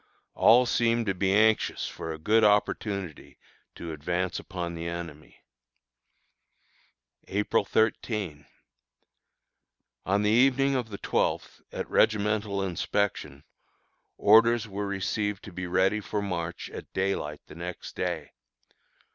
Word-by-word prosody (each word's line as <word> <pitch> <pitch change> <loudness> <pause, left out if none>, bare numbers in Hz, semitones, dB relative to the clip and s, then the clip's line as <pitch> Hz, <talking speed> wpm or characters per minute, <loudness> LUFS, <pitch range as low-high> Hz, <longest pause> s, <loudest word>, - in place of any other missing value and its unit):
All 120 +3 +6
seem 115 -1 +1
to 100 - 0
be 95 +1 0
anxious 110 +2 +2
for 80 - -6
a 80 - -5
good 110 +8 +3
opportunity 100 -4 0 0.4
to 85 - -7
advance 90 +4 -2
upon 90 -3 -5
the 85 0 -5
enemy. 85 -3 -8 1.8
April 105 +3 +1
13. 105 - -1 1.6
On 100 +2 +2
the 105 - +2
evening 135 +3 +4
of 125 -3 -2
the 100 - -6
twelfth, - - -1
at - - -4
regimental 105 -2 +1
inspection, 85 -5 -2 0.7
orders 115 +2 +5
were 100 0 -4
received 100 +1 -2
to 100 - -10
be 90 0 -5
ready 95 +4 +2
for 105 0 -3
march 85 -4 -4
at - - -9
daylight 95 -6 -2
the - - -13
next 85 +2 -7
day. - - -3
100 Hz, 120 wpm, -27 LUFS, 85-110 Hz, 1.8 s, All